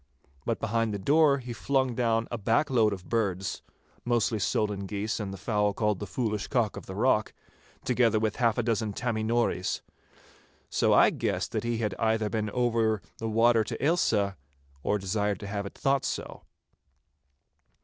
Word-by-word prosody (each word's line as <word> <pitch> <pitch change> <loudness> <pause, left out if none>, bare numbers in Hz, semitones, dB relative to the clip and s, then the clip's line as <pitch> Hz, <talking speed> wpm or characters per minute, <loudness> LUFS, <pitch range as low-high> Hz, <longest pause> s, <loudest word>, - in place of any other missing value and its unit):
But - - 0
behind 115 -1 0
the - - -1
door 145 +7 +4
he 125 -2 -6
flung 130 +3 0
down 115 -1 +1
a 120 - -2
back 115 +8 +1
load 110 -4 +4
of 95 -2 -6
birds—mostly 110 +2 -2
solan 100 0 -1
geese 105 +3 -2
and 100 -3 -4
the 95 - -7
fowl 105 +1 0
called 105 -4 0
'the 105 - -5
Foolish 105 0 -2
Cock 120 -6 0
of - - -9
the 95 - -6
Rock,' 110 -1 +1 0.5
together 120 -3 +3
with 110 -1 -1
half 115 -2 +2
a 120 - +1
dozen 110 -2 0
'Tammy 115 0 -2
Nories.' 115 -5 0 0.9
So - - +2
I - - +6
guessed - - -2
that - - -2
he 120 -1 -1
had 105 -3 -1
either 110 -2 +1
been 110 0 -1
over 115 -2 +1 0.2
the 115 - -2
water 115 +1 +4
to - - -5
Ailsa, 105 - +2 0.4
or 105 - +1
desired 100 0 -1
to - - -6
have 100 0 -3
it - - -12
thought 140 -2 +1
so. - - -5
110 Hz, 170 wpm, -28 LUFS, 105-120 Hz, 0.9 s, I